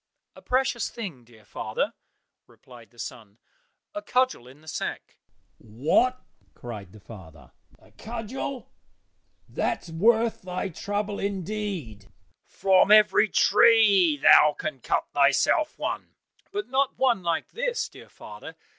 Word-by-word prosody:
"A -, -, -14 dB
precious 255 Hz, -2 st, 0 dB
thing, 185 Hz, -, -8 dB
dear 115 Hz, -3 st, -20 dB
father," 110 Hz, 0 st, -3 dB, 0.5 s
replied 120 Hz, -4 st, -17 dB
the 120 Hz, -, -27 dB
son, 110 Hz, -2 st, -9 dB, 0.6 s
"a 310 Hz, -, -5 dB
cudgel 255 Hz, -, 0 dB
in 135 Hz, +4 st, -16 dB
the 155 Hz, -, -21 dB
sack." -, -, -6 dB, 0.4 s
"What!" 150 Hz, -, 0 dB, 0.3 s
cried 105 Hz, -7 st, -9 dB
the 110 Hz, -, -15 dB
father, 90 Hz, -, -14 dB, 0.3 s
"a -, -, -23 dB
cudgel! 240 Hz, +3 st, -6 dB, 0.8 s
That's 170 Hz, -, -3 dB
worth 225 Hz, +7 st, +2 dB
thy 185 Hz, +1 st, -4 dB
trouble, 205 Hz, +4 st, -4 dB
indeed! 190 Hz, -, -5 dB, 0.4 s
From 190 Hz, 0 st, +3 dB
every 210 Hz, 0 st, +5 dB
tree 200 Hz, -8 st, +5 dB
thou 150 Hz, +1 st, +6 dB
can 155 Hz, -4 st, -5 dB
cut -, -, -1 dB
thyself 145 Hz, -, +2 dB
one." -, -, -5 dB, 0.4 s
"But 405 Hz, 0 st, -4 dB
not 265 Hz, +1 st, 0 dB
one 250 Hz, -6 st, +2 dB
like 170 Hz, -2 st, -2 dB
this, -, -, -2 dB
dear -, -, -15 dB
father. -, -, -11 dB
190 Hz, 125 wpm, -25 LUFS, -, 0.8 s, thou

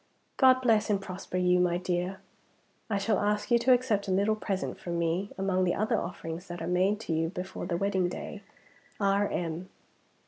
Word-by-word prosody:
"God 260 Hz, -1 st, +5 dB
bless 220 Hz, -3 st, +3 dB
and 205 Hz, -2 st, +2 dB
prosper 185 Hz, -1 st, -6 dB
you, 180 Hz, 0 st, +3 dB
my 175 Hz, -1 st, +2 dB
dear. 180 Hz, +1 st, -2 dB, 0.7 s
I 205 Hz, -, +1 dB
shall 200 Hz, 0 st, +1 dB
ask 210 Hz, +3 st, 0 dB
you 235 Hz, -, +6 dB
to 245 Hz, +2 st, +3 dB
accept 240 Hz, -5 st, +2 dB
a -, -, -1 dB
little 200 Hz, +3 st, +2 dB
present 195 Hz, -3 st, -3 dB
from 170 Hz, -1 st, -4 dB
me, 170 Hz, +4 st, 0 dB
among 190 Hz, -1 st, +1 dB
the 175 Hz, -, +1 dB
other 215 Hz, +2 st, +1 dB
offerings 170 Hz, +1 st, -6 dB
that 175 Hz, 0 st, -6 dB
are 165 Hz, -, -4 dB
made 185 Hz, +4 st, +2 dB
to 170 Hz, -, -3 dB
you 160 Hz, +1 st, 0 dB
before 185 Hz, 0 st, -6 dB
the 170 Hz, -2 st, -1 dB
wedding 190 Hz, -2 st, +1 dB
day. 205 Hz, +3 st, -7 dB, 0.6 s
R.M." 190 Hz, -4 st, 0 dB
190 Hz, 185 wpm, -29 LUFS, 180-210 Hz, 0.7 s, you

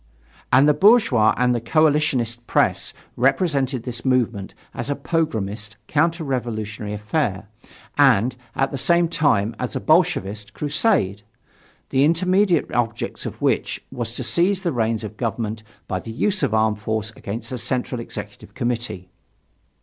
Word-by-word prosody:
But 135 Hz, -, +6 dB
the 150 Hz, -, +5 dB
bourgeois 170 Hz, -, +5 dB
and 125 Hz, 0 st, +3 dB
the 120 Hz, -, -1 dB
coalitionist 135 Hz, -4 st, +1 dB
press -, -, +1 dB, 0.2 s
represented 135 Hz, -2 st, +1 dB
this 120 Hz, -1 st, -4 dB
movement 120 Hz, -7 st, 0 dB, 0.2 s
as 120 Hz, -, -5 dB
a 145 Hz, -, 0 dB
pogromist, 110 Hz, -10 st, -2 dB
counter 165 Hz, +2 st, +1 dB
revolutionary 110 Hz, -6 st, -3 dB
affair, 105 Hz, -1 st, -2 dB, 0.5 s
and, 125 Hz, -3 st, +4 dB, 0.2 s
at 135 Hz, 0 st, +1 dB
the 135 Hz, -, -3 dB
same 170 Hz, +4 st, +3 dB
time, 115 Hz, -10 st, +1 dB
as 125 Hz, -, -3 dB
a -, -, 0 dB
Bolshevist 110 Hz, -, +1 dB
crusade, 145 Hz, -, +1 dB, 0.7 s
the 135 Hz, -, +3 dB
immediate 180 Hz, +2 st, +2 dB
object 115 Hz, -1 st, -2 dB
of -, -, -8 dB
which -, -, +1 dB
was 120 Hz, -1 st, -4 dB
to 130 Hz, -, -3 dB
seize 180 Hz, -, +1 dB
the 170 Hz, -, 0 dB
reins 115 Hz, -2 st, 0 dB
of 110 Hz, 0 st, -7 dB
Government 110 Hz, -2 st, -3 dB, 0.3 s
by 95 Hz, -, -2 dB
the 115 Hz, -, -8 dB
use 195 Hz, -, 0 dB
of -, -, +1 dB
armed 110 Hz, -1 st, +2 dB
force 110 Hz, 0 st, -2 dB
against 115 Hz, +4 st, -6 dB
the 125 Hz, -, -3 dB
Central 125 Hz, 0 st, -2 dB
Executive 105 Hz, -3 st, -9 dB
Committee. 120 Hz, -7 st, -3 dB
120 Hz, 145 wpm, -22 LUFS, 110-150 Hz, 0.7 s, But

